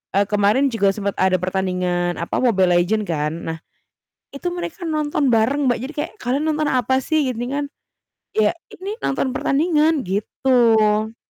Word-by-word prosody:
eee, 200 - +4
kemarin 210 +7 +3
juga 205 -5 +2
sempet 200 -2 -3
ada 190 0 +3
pertandingan, 180 -1 -1
apa, 170 - -2
Mobile 190 -7 +3
Legends 205 +4 0
kan, 150 -2 -1 0.2
nah 160 0 -3 0.8
itu 280 +5 -5
mereka 350 +2 -6
nonton 300 -2 0
bareng 265 +6 +2
Mbak, 245 - +1
jadi 280 +4 -6
kayak, 295 - -2
"Kalian 260 +5 -1
nonton 305 0 0
apa 260 +1 +1
sih?" 295 0 0
Gini 240 0 -3
kan, 290 0 -1 0.7
"Ya 210 -1 +3 0.2
ini 395 +3 -6
nonton 265 -1 -1
pertandingan." 305 -1 +2
Gitu. 220 +1 +2
230 Hz, 155 wpm, -21 LUFS, 195-285 Hz, 0.8 s, eee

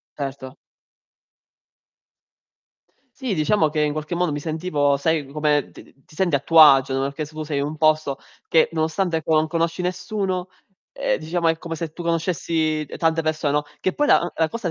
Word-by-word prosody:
Certo. 135 -1 -6 2.6
Sì, 260 -6 -2
diciamo 155 0 +2
che 155 0 -1
in 150 -1 +1
qualche 155 +2 -5
modo 175 -1 0
mi 145 - -3
sentivo, 155 -2 0
sai, 155 +1 0
come 150 -1 0
ti - - -13 0.2
ti - - -20
senti 175 -1 +1
a - - +1
tuo 165 +4 +3
agio, 135 -3 +6
no, 135 - 0
perché 140 +3 -3
su 155 +1 -8
sei 150 -2 -2
un 145 +2 -3
posto 155 -3 +1 0.3
che 160 - +4
nonostante, 160 +2 0
ecco, 160 0 -1
non 155 0 +3
conosci 165 +2 -1
nessuno, 185 0 -3 0.4
ehm, - - -1
diciamo 165 +2 -1
è 165 0 +2
come 165 0 -6
se 165 -1 -5
tu 175 - -7
conoscessi 165 -2 -1
tante 165 0 +1
persone, 155 -2 0
no, 150 0 +1 0.2
che 185 - -1
poi 295 - +1
la - - +5
uhm, 175 - -2
la 160 - +2
cosa 225 -7 -3
160 Hz, 185 wpm, -22 LUFS, 150-170 Hz, 2.6 s, agio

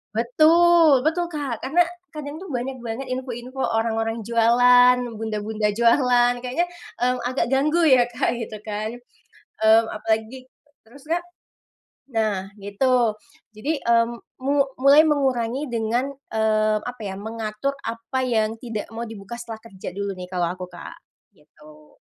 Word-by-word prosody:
Betul 310 +3 +5
betul, 345 +2 +1
Kak. 280 -7 -4
Karena 335 +6 +3 0.2
kadang 300 -1 -7
tuh 360 -1 -9
banyak 250 0 -4
banget 235 +4 -5
info-info 255 0 -5
orang-orang 225 0 -1
jualan, 245 +2 +5 0.2
bunda-bunda 215 -1 -2
jualan, 245 +2 +3
kayaknya, 320 +8 -1 0.3
mmm, 250 +1 +2
agak 255 +2 -1
ganggu 285 +6 +2
ya 255 -3 +6
Kak 240 0 0
gitu 220 -2 -6
kan, 215 +1 -4 0.7
mmm, 220 +1 +6
apalagi 220 +4 -2 0.4
terus 270 +6 -17
Kak? 345 +1 0 0.9
Nah 210 -5 -1
gitu 225 +3 +1 0.4
jadi, 285 +9 -2
mmm, 235 0 +2 0.2
mu 280 +1 +2 0.2
mulai 285 +3 +7
mengurangi 270 -2 0
dengan, 235 +3 -1 0.2
eee, 215 -1 +2
apa 245 -2 -7
ya, 190 -1 -4
mengatur 225 +5 -4
apa 230 +3 -4
yang 225 -2 0
tidak 230 -3 -6
mau 230 +1 -5
dibuka 225 +1 -8
setelah 225 -2 -8
kerja 190 -2 -8
dulu 200 0 -3
nih 180 - -6
kalau 180 -2 -2
aku 180 - -6
Kak, - - -10 0.4
gitu. 150 0 -19
235 Hz, 135 wpm, -23 LUFS, 220-265 Hz, 0.9 s, mulai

